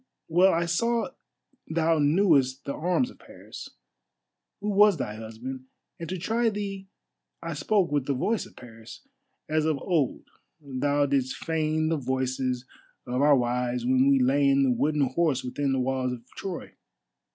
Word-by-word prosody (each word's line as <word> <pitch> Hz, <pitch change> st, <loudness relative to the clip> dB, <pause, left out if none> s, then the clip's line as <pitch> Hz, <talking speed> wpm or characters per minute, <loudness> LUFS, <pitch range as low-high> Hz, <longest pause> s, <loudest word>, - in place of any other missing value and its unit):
Well 180 Hz, +4 st, +5 dB
I 170 Hz, +1 st, +1 dB
saw 230 Hz, +8 st, 0 dB, 0.6 s
thou 165 Hz, 0 st, +2 dB
knewest 145 Hz, -4 st, +3 dB
the 140 Hz, -, -3 dB
arms 180 Hz, +10 st, 0 dB
of -, -, -19 dB
Paris, -, -, -11 dB, 0.9 s
who 210 Hz, +1 st, -3 dB
was 205 Hz, -2 st, +5 dB
thy 105 Hz, -6 st, -3 dB
husband, 120 Hz, +4 st, -7 dB, 0.3 s
and 165 Hz, -, -6 dB
to 185 Hz, -, -3 dB
try 225 Hz, +6 st, +1 dB
thee 200 Hz, -2 st, -5 dB, 0.6 s
I 165 Hz, 0 st, -3 dB
spoke 180 Hz, +4 st, +1 dB
with 145 Hz, -3 st, 0 dB
the 140 Hz, -, 0 dB
voice 215 Hz, -, -1 dB
of -, -, -20 dB
Paris, 115 Hz, -, -13 dB, 0.4 s
as 155 Hz, 0 st, +1 dB
of 155 Hz, -2 st, +1 dB
old 155 Hz, -5 st, -1 dB, 0.4 s
thou 145 Hz, 0 st, 0 dB
didst 135 Hz, -2 st, 0 dB
feign 155 Hz, -1 st, 0 dB
the 165 Hz, -, +1 dB
voices 130 Hz, -1 st, -2 dB, 0.4 s
of 125 Hz, +1 st, -1 dB
our 145 Hz, 0 st, +6 dB
wives 125 Hz, 0 st, -1 dB
when 130 Hz, +1 st, +3 dB
we 140 Hz, -, +5 dB
lay 140 Hz, +2 st, +3 dB
in 140 Hz, 0 st, +4 dB
the 130 Hz, -, +3 dB
wooden 145 Hz, +5 st, +1 dB
horse 135 Hz, 0 st, +1 dB
within 135 Hz, +2 st, -2 dB
the 135 Hz, -, +1 dB
walls 130 Hz, 0 st, -1 dB
of 120 Hz, -1 st, -9 dB
Troy. 185 Hz, -3 st, -6 dB
145 Hz, 165 wpm, -27 LUFS, 130-170 Hz, 0.9 s, our